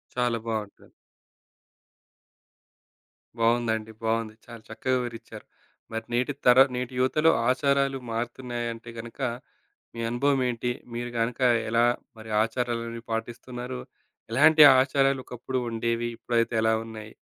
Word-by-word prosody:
చాలా 120 -1 +1
బావుంటది. 110 -3 -5 2.5
బావుందండి. 115 -1 +1
బావుంది. 110 -1 -1
చాలా 115 -1 -10
చక్కగా 130 +4 -1
వివరించారు. 115 -3 -8 0.5
మరి 110 0 -3
నేటి 125 +4 +1
తర 125 +1 +7 0.2
నేటి 125 +1 -3
యువతలో 155 +5 +3 0.2
ఆచారాలు 140 0 +1
మారుతున్నాయంటే 120 0 -4
గనుక, 120 +4 -9 0.7
మీ 115 - -6
అనుభవం 135 +3 +1
ఏంటి? 120 0 -2 0.2
మీరు 120 0 -4
గనుక 115 +3 -1 0.3
ఎలా 115 +1 +3 0.3
మరి 110 0 -10
ఆచారాలన్నీ 115 0 -3
పాటిస్తున్నారు? 125 +2 -5 0.5
ఎలాంటి 155 +4 +6 0.2
ఆచారాలు 135 0 +2
ఒకప్పుడు 130 +2 -4
ఉండేవి? 115 +1 -1
ఇప్పుడైతే 115 0 0
ఎలా 110 0 +3
ఉన్నాయి? 110 -1 -9
120 Hz, 110 wpm, -26 LUFS, 115-130 Hz, 2.5 s, తర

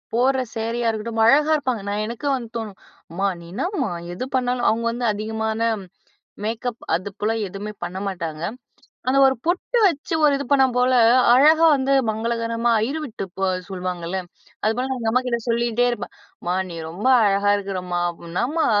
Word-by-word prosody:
போடுற 260 +2 +3
சேரியா 230 +1 -1
இருக்கட்டும் 225 0 -1
அழகா 300 +5 +5
இருப்பாங்க! 255 -7 -1
நான் 210 +1 -1
எனக்கு 235 +5 -5
வந்து 235 -3 -6
தோணும், 215 -4 -6 0.3
"அம்மா! 195 +4 0
நீ - - -12
என்னம்மா 345 - -1 0.2
எது 220 +8 -4
பண்ணாலும்" 250 -1 +1
அவங்க 230 +1 -2
வந்து 240 +1 -3
அதிகமான 220 +1 -3 0.8
மேக்கப் 230 +2 -3
அது 185 +4 -2
போல 215 +2 +1 0.2
எதுவுமே 205 +3 -6
பண்ண 175 +2 -4
மாட்டாங்க. 165 -4 -4 0.7
அந்த 270 +1 +3
ஒரு 265 - +3
பொட்டு 365 +7 0
வச்சு, 330 0 -1
ஒரு 290 - +6
இது 280 - -4
பண்ணா 270 -1 +6
போல 250 +1 +3 0.4
அழகா 315 +5 +6
வந்து 270 0 0 0.2
மங்களகரமா, 230 +1 -1
அய்யர் 265 +9 -1
வீட்டு 220 -6 -6
பொ 195 - -3 0.3
சொல்லுவாங்கல்ல, 180 -1 -4 0.5
அதுபோல 240 +5 0
நான் 260 - -2
எங்க 225 -1 0
அம்மாகிட்ட 250 -2 0
சொல்லிட்டே 235 +1 +1
இருப்பேன். 240 - -5 0.3
"அம்மா! 175 +1 -1 0.2
நீ 170 - -7
ரொம்ப 195 +9 -5 0.2
அழகா 200 0 +3
இருக்கறம்மா 180 -3 -3 0.2
ப் - - -14
என்னாம்மா?" 290 - 0
230 Hz, 165 wpm, -22 LUFS, 205-255 Hz, 0.8 s, ஒரு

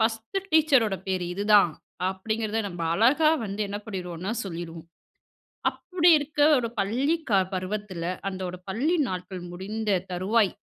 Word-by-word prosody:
First 225 - 0
டீச்சரோட 275 -10 +4
பேரு 185 -2 -1
இதுதான், 205 -4 +4 0.4
அப்படிங்கிறத 220 +3 -2
நம்ம 175 -2 -6
அழகா 290 - +4
வந்து 200 +1 -5
என்ன 205 +1 -4
பண்ணிருவோம்னா, 185 -1 -4
சொல்லிருவோம். 165 -2 -7 0.8
அப்படி 355 -2 +1
இருக்க 295 +1 -6 0.2
ஒரு 235 -2 -1
பள்ளி 255 +11 +1
க 195 -2 +5
பருவத்துல, 185 -1 -4 0.3
அந்த 190 -1 -6
ஒரு 180 0 -8
பள்ளி 285 - +1
நாட்கள் 185 -1 -5
முடிந்த 200 +1 -1
தருவாய் 195 +3 +2
205 Hz, 130 wpm, -26 LUFS, 185-230 Hz, 0.8 s, க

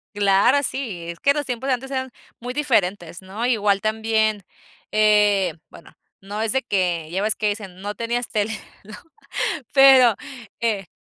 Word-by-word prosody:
Claro, 205 +7 +3
sí, 220 -13 -4
es 170 - -12
que 280 - +3
los 290 0 -2
tiempos 250 +1 -4
de 270 - +2
antes 265 +2 -5
eran 260 -1 -3 0.3
muy 245 +1 -6
diferentes, 200 - -1
¿no? 195 +5 -5
Igual 210 -5 +2
también, 220 -1 0 0.5
eh, 210 -2 +3 0.2
bueno, - - -15 0.3
no 205 +2 -6
es 220 -1 0
de 265 0 0
que 180 -7 -1
ya 190 +2 -1
ves 215 0 +1
que 210 - 0
dicen: 200 -3 -6
"No 205 +1 -4
tenías 235 +2 -2
tele", 215 0 -1 0.3
¿no? 210 +1 -11 0.8
pero, 265 -4 +7 0.5
eh 210 -5 -1
215 Hz, 165 wpm, -22 LUFS, 195-245 Hz, 0.8 s, pero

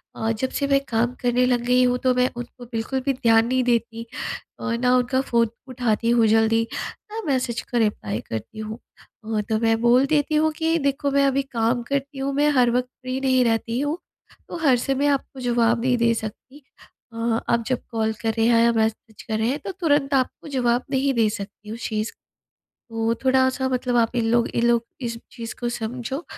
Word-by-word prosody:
अ, 225 0 -1
जब 245 +4 -2
से 280 +1 -1
मैं 275 0 +4
काम 235 +2 +1
करने 245 0 +2
लग 245 -1 +2
गई 250 +1 +4
हूँ, 250 0 +2
तो 255 0 +2
मैं 250 0 +3
उनको 245 0 -8
बिल्कुल 230 +4 -2
भी 275 - +2
ध्यान 230 -3 +3
नहीं 255 +1 +1
देती 230 -1 0 0.5
और 235 -1 -2
ना 250 +1 +3
उनका 250 +1 +1
फ़ोन 235 -3 +1 0.2
उठाती 235 -3 0
हूँ 235 -2 +4
जल्दी, 225 +1 +3 0.4
ना 450 +1 -4
मैसेज 255 -4 0
का 245 - -4
रिप्लाई 160 - 0
करती 115 - -6
हूँ। 215 +1 -6 0.5
वो 220 -1 -1
तो 220 - +2
मैं 225 -1 +2
बोल 245 +3 +5
देती 300 +1 +1
हूँ, 315 +1 +3
कि 325 +1 +1
देखो 280 0 0
मैं 280 0 +3
अभी 275 0 +2
काम 240 -2 0
करती 275 +2 -3
हूँ, 275 +1 -1
मैं 290 +2 +3
हर 250 -3 +4
वक़्त 250 +1 0
फ्री 255 +1 -3
नहीं 260 -1 +3
रहती 230 +1 0
हूँ, 290 +3 -1 0.5
तो - - -5
हर 280 -6 +3
समय 270 +4 0
आपको 275 -1 -1
जवाब 235 -1 +2
नहीं 250 0 +2
दे 230 0 +3
सकती। 230 +6 -7 0.5
अ, - - -12 0.3
आप 235 0 +2
जब 255 -2 -1
कॉल 220 -1 0
कर 225 -1 0
रहे 225 - +3
हैं 230 -1 +5
या 235 - +5
मैसेज 220 -1 -2
कर 220 -1 -2
रहे 220 - +1
हैं, 285 +4 -1
तो 385 - -5
तुरंत 295 -6 +1
आपको 265 +3 0
जवाब 250 -3 +1
नहीं 270 0 +1
दे 225 -3 +3
सकती 210 0 -8
हूँ। 225 - -5
शीज़ 215 -2 -3 0.8
तो 225 0 0
थोड़ा-सा 260 0 +2
मतलब 250 -1 0
आप 230 0 +2
इन 235 - +1
लोग 235 0 +3
इन 235 - 0
लोग, 235 -1 +3 0.2
इस 235 -2 -4
चीज़ 230 -2 -7
को 240 - -1
समझो, 245 +5 -4
245 Hz, 205 wpm, -23 LUFS, 230-265 Hz, 0.8 s, बोल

